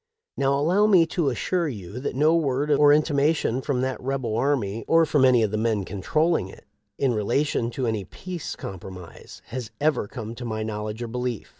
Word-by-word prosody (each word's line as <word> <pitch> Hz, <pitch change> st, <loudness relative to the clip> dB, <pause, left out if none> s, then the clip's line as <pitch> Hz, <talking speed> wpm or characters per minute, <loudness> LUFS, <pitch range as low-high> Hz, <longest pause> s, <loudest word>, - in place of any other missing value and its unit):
Now 140 Hz, 0 st, +1 dB
allow 180 Hz, +9 st, +3 dB
me 185 Hz, -6 st, +6 dB
to 165 Hz, -3 st, 0 dB
assure 170 Hz, +7 st, -1 dB
you 105 Hz, -4 st, -6 dB
that 135 Hz, -, -4 dB
no 155 Hz, +4 st, +4 dB
word 145 Hz, -2 st, 0 dB
or 145 Hz, 0 st, +6 dB
intimation 145 Hz, -3 st, +2 dB
from 130 Hz, -2 st, -1 dB
that 130 Hz, 0 st, -2 dB
rebel 130 Hz, -4 st, -2 dB
army 115 Hz, -4 st, 0 dB
or 165 Hz, 0 st, +5 dB
from 150 Hz, -3 st, +2 dB
any 125 Hz, -3 st, +5 dB
of 105 Hz, -, 0 dB
the 110 Hz, -, -1 dB
men 110 Hz, -3 st, 0 dB
controlling 155 Hz, -, 0 dB
it, -, -, -14 dB, 0.3 s
in 135 Hz, -3 st, +1 dB
relation 115 Hz, +3 st, 0 dB
to 125 Hz, +1 st, -3 dB
any 110 Hz, -3 st, -1 dB
peace 180 Hz, -, -7 dB
compromise, 95 Hz, -2 st, -10 dB
has 120 Hz, -1 st, -5 dB
ever 145 Hz, -8 st, +1 dB
come 115 Hz, -1 st, -7 dB
to 120 Hz, -, -8 dB
my 110 Hz, -2 st, -3 dB
knowledge 105 Hz, +1 st, -4 dB
or -, -, -4 dB
belief. 125 Hz, -1 st, -4 dB
130 Hz, 190 wpm, -25 LUFS, 110-150 Hz, 0.3 s, me